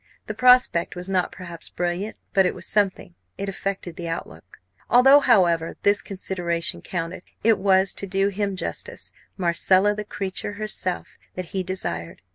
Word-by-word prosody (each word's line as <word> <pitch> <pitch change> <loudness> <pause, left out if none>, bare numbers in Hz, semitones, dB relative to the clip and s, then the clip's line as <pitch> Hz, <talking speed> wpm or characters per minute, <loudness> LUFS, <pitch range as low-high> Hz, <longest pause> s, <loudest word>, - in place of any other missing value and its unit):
The - - -4
prospect 250 -9 +4
was 180 +1 -5
not 185 -2 0
perhaps 170 -3 -8
brilliant, 175 +4 -3 0.2
but 190 -2 +4
it - - -3
was - - -8
something; 200 -4 0 0.2
it 200 - -4
affected 195 -3 -4
the 170 -1 -5
outlook. 90 - -7 0.3
Although, 270 +4 +7
however, 175 - +3
this 205 0 +3
consideration 175 -3 0
counted, 170 0 -4 0.2
it 225 -1 +4
was, 190 -1 +3
to 200 - -5
do 195 +1 +1
him 200 0 -2
justice, 185 - -6 0.3
Marcella, 185 +3 +3
the 210 0 -5
creature 200 0 -4
herself, 205 -4 -3 0.2
that 185 -2 -5
he 190 - 0
desired. 135 - -5
190 Hz, 155 wpm, -24 LUFS, 175-200 Hz, 0.3 s, Although